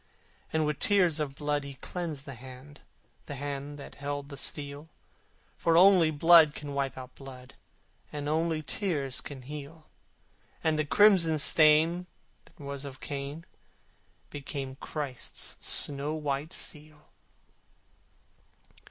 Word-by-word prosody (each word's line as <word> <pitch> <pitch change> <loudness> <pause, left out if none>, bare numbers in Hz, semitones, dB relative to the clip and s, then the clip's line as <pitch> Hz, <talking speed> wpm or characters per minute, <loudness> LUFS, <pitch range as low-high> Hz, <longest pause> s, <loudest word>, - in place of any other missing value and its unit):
And 160 -1 +1
with 150 -2 -2
tears 180 -6 +3
of 140 -3 -3
blood 145 0 -1
he 140 -1 -8
cleansed 155 -2 -5
the 140 - -7
hand, 130 +3 -12 0.5
The 145 - -5
hand 145 +1 -5
that 140 - -10
held 145 0 -5
the 140 - -7
steel: 145 +2 -4 0.7
For 165 0 +3
only 180 -3 +7
blood 155 0 +6
can 145 -1 -6
wipe 140 -1 -2
out 130 -1 -9
blood, 130 -2 -12 0.6
And 145 -1 -5
only 160 +1 0
tears 145 -5 -1
can 135 -3 -9
heal: 150 +3 -9 0.8
And 155 -1 +1
the 155 - +1
crimson 175 -2 +5
stain 160 +4 +4 0.4
that - - -23
was 140 -1 -5
of 135 -2 -8
Cain 145 +3 -6 0.9
Became 135 -1 -5
Christ's 135 -2 -4
snow 145 +2 +2
white 150 +1 -3
seal. 150 -1 -5
145 Hz, 125 wpm, -29 LUFS, 140-160 Hz, 0.9 s, only